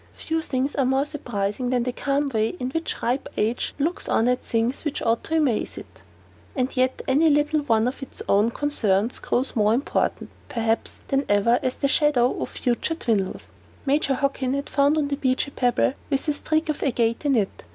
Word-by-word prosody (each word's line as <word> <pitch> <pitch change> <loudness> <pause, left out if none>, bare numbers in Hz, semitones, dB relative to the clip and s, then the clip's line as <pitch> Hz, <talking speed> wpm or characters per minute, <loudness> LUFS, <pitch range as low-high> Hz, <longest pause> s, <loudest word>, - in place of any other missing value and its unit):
Few 325 0 -2
things 270 -1 -1
are 275 - +1
more 265 +2 +2
surprising 245 -5 -3
than 250 -1 +1
the 250 - -1
calm 280 +2 0
way 220 +3 0
in 250 +1 -3
which 325 +3 -3
ripe 250 +3 0
age 225 +3 -1
looks 315 +5 -2
on 225 - +2
at 250 0 +1
things 230 +3 -1
which 300 -3 -2
ought 230 0 +1
to 320 - 0
amaze 275 -8 0
it. - - -11 0.5
And 260 -1 -1
yet 255 0 +1
any 300 +5 +4
little 295 +1 +2
one 225 -4 +2
of 260 +3 -4
its 270 - -6
own 205 +3 +4
concerns 230 -6 0
grows 260 +3 -1
more 215 0 +3
important, 275 +5 -1 0.2
perhaps, 225 -1 -1
than 275 0 +2
ever 205 +4 +3
as 255 - -1
the 280 - 0
shadow 275 -4 +3
of - - -3
the - - -9
future 245 +6 0
dwindles. 215 - -2 0.3
Major 275 -1 +2
Hockin 275 -1 0
had 280 +1 -4
found 285 +2 +3
on 295 -2 +1
the 280 - -1
beach 260 0 +1
a - - -9
pebble 245 -1 +1 0.2
with 275 +1 -1
a 300 - +2
streak 310 +2 -1
of 300 - -2
agate 235 -3 0
in 285 -2 +2
it. 205 - -1
260 Hz, 205 wpm, -24 LUFS, 235-285 Hz, 0.5 s, any